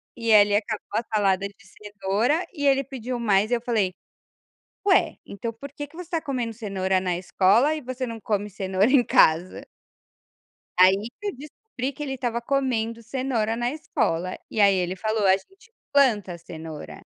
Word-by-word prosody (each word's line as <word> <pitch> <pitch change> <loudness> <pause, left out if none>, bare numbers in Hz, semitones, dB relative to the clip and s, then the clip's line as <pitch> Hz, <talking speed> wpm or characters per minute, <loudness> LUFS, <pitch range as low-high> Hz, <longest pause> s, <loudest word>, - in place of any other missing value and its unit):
e 230 -2 -1
ele 205 -1 +6
acabou 215 +1 -2
a 230 - +1
salada 200 -2 +2
de 200 - -18
cenoura 210 - -1
e 285 -3 -3
ele 275 0 +4
pediu 255 -2 -5
mais 215 -1 +2
e - - +3
eu 235 - -3
falei: 215 -6 0 0.9
"Ué, 380 -2 +3
então 230 +3 -5
por 280 +4 -10
que 290 0 -6
que 310 - -20
você 355 -1 -9
tá 330 -2 -1
comendo 245 -5 -3
cenoura 190 -4 -1
na 180 -2 -1
escola 205 +10 +3
e 305 - -5
você 255 0 -4
não 230 -1 -6
come 210 -1 -2
cenoura 195 +3 +1
em 265 -3 +5
casa?". 165 +4 +3 1.1
Aí 190 +4 +5
que 415 - -5
eu 400 - -3
descobri 280 - -6
que 295 - -6
ele 270 -2 -3
estava 240 -2 -2
comendo 235 -3 -1
cenoura 230 -2 -1
na 240 +2 -1
escola 185 - -2
e 220 - -3
aí 200 -1 +6
ele 185 0 -1
falou 215 +1 -1
a 190 - +6
gente 390 - -15 0.2
planta 210 -11 +3
cenoura. 160 -2 -9
225 Hz, 180 wpm, -25 LUFS, 195-265 Hz, 1.1 s, ele